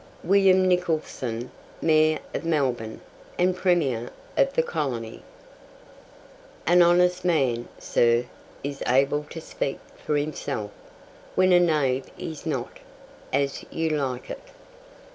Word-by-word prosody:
WILLIAM 190 0 +5
NICHOLSON, 155 -9 -1 0.3
MAYOR 155 -1 +4 0.2
OF - - -3
MELBOURNE, 130 -9 -1 0.4
AND 180 0 +2
PREMIER 165 -11 +1 0.3
OF - - +3
THE 485 - +2
COLONY. 120 - -3 1.4
"An 175 +1 +5
honest 180 +1 +4
man, 135 -9 +1
sir, 120 +1 +2 0.4
is 140 0 -5
able 140 +4 +2
to 165 - -7
speak 140 -3 -3 0.3
for 150 - +1
himself, 140 -7 -3 0.6
when 185 0 +4
a 175 - +7
knave 145 -6 +2
is 160 0 -6
not." 130 -6 -3 0.5
As 140 0 0
You 165 0 -1
Like 135 -5 -2
It. - - -7
150 Hz, 115 wpm, -25 LUFS, 130-175 Hz, 1.4 s, a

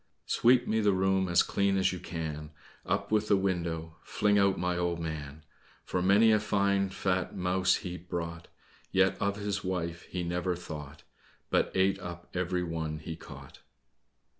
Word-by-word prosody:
"Sweep 125 +1 +4
me 110 - +1
the 105 -2 +3
room 95 0 +2
as 85 0 +5
clean 100 -1 +1
as 95 -1 +2
you 90 - -5
can, 80 -3 -5 0.4
Up - - -1
with 110 0 +2
the 100 - +4
window, 85 -4 -2
fling 105 -1 +2
out 100 -1 +3
my 90 0 0
old 85 -1 -1
man! 75 -2 -5 0.4
For 90 - -1
many 100 +5 +5
a 110 - +4
fine 100 -2 +1
fat 95 -1 -1
mouse 90 0 +2
he 90 0 -4
brought, 85 -1 -5 0.4
Yet 95 0 +3
of 100 0 +1
his 105 -1 -3
wife 85 -2 -3
he 90 -1 -3
never 90 +1 -1
thought, 75 -4 -8 0.5
But - - +2
ate 95 +1 +3
up 85 -2 -8
every 90 0 -1
one 80 -2 -3
he 80 +1 -6
caught." - - -12
90 Hz, 165 wpm, -30 LUFS, 85-100 Hz, 0.5 s, as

